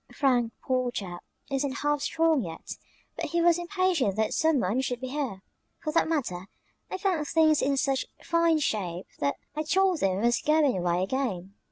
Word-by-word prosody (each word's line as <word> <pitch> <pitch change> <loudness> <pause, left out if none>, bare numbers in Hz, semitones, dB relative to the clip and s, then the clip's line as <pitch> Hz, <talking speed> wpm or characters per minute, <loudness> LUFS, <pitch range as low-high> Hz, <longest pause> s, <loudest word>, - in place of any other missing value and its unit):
"Frank, 245 -5 +2
poor 255 -2 0
chap, 180 -7 -6 0.3
isn't 275 0 0
half 295 -1 +1
strong 325 -3 +2
yet, 165 -5 -7 0.4
but - - -3
he 340 - -1
was 340 0 +4
impatient 350 - +1
that 220 0 0
some 315 -3 +3
one 220 +5 +1
should 245 -2 -2
be 260 0 -5
here. 255 -9 -3 0.3
For 305 -2 -4
that 330 - +3
matter, 195 - -2 0.4
I - - -3
found 365 -6 0
things 315 -1 +4
in 275 0 +1
such 270 -1 0 0.2
fine 335 -1 +3
shape 190 - -2
that 140 0 0 0.2
I 305 - -1
told 370 +2 +2
them 190 -1 +1
I - - -2
was 240 0 +2
going 305 -3 +3
away 175 0 0
again. 195 -5 -2
270 Hz, 185 wpm, -27 LUFS, 205-320 Hz, 0.4 s, was